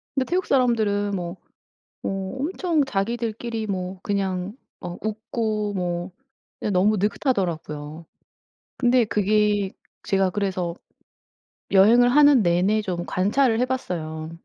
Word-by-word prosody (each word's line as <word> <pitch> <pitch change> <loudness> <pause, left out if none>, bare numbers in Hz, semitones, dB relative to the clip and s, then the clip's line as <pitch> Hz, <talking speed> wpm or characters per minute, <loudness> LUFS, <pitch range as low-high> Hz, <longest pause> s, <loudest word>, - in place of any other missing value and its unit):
근데 265 - +1
태국 360 +6 0
사람들은 220 -6 +2
뭐, 175 0 -5 0.7
뭐 195 +3 -3
엄청 330 -1 0
자기들끼리 230 0 -2
뭐 185 -1 -4
그냥 195 +1 -2 0.2
어 175 - -6
웃고 215 -1 -2
뭐 175 0 -2 0.5
그냥 210 - -1
너무 200 +3 +3
느긋하더라고요. 170 - -2 0.7
근데 245 -1 +3
그게 210 -1 +1 0.3
제가 195 -1 +2
그래서 185 -3 -2 1.0
여행을 225 +6 +6
하는 285 -2 +6
내내 185 +4 +2
좀 175 -3 -3
관찰을 225 +5 +2
해 - - +4
봤어요. 160 -11 -4
205 Hz, 245 characters per minute, -24 LUFS, 185-235 Hz, 1.0 s, 여행을